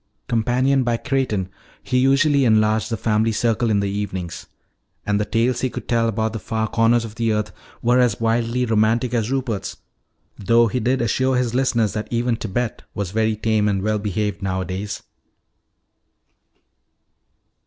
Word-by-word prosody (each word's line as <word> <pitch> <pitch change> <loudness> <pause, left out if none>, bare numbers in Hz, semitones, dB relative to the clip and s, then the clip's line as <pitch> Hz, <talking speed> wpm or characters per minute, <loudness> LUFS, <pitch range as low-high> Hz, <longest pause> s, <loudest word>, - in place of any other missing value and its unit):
Companioned 125 +4 +2
by 120 -1 0
Creighton, 130 -8 -1 0.4
he 125 -1 +1
usually 140 +2 +3
enlarged 110 -1 +2
the 115 - -2
family 110 +2 +1
circle 115 +1 0
in 100 -2 +2
the 100 - -1
evenings. 95 -4 -5 0.6
And 105 0 +1
the - - 0
tales 115 +3 0
he 130 - 0
could - - -7
tell 115 -1 +2
about 110 0 -1
the 110 - -4
far 110 0 -2
corners 115 +1 +2
of 110 - -8
the 115 0 0
earth 105 -1 -1 0.3
were 120 +2 +4
as 120 -4 +2
wildly 115 +2 0
romantic 115 +2 +1
as 115 -2 0
Rupert's 130 -7 -3 0.6
though 115 +4 +4
he 120 +3 -1
did 125 +2 +1
assure 130 +3 +1
his 125 -2 0
listeners 120 -5 +1
that 105 0 -4
even 120 0 0
Tibet 115 +2 -3
was 100 -3 -3
very 110 +1 +1
tame 110 -1 +1
and 100 -2 0
well 105 0 0
behaved 105 0 -2
nowadays. 95 +1 -3
115 Hz, 160 wpm, -21 LUFS, 105-120 Hz, 0.6 s, were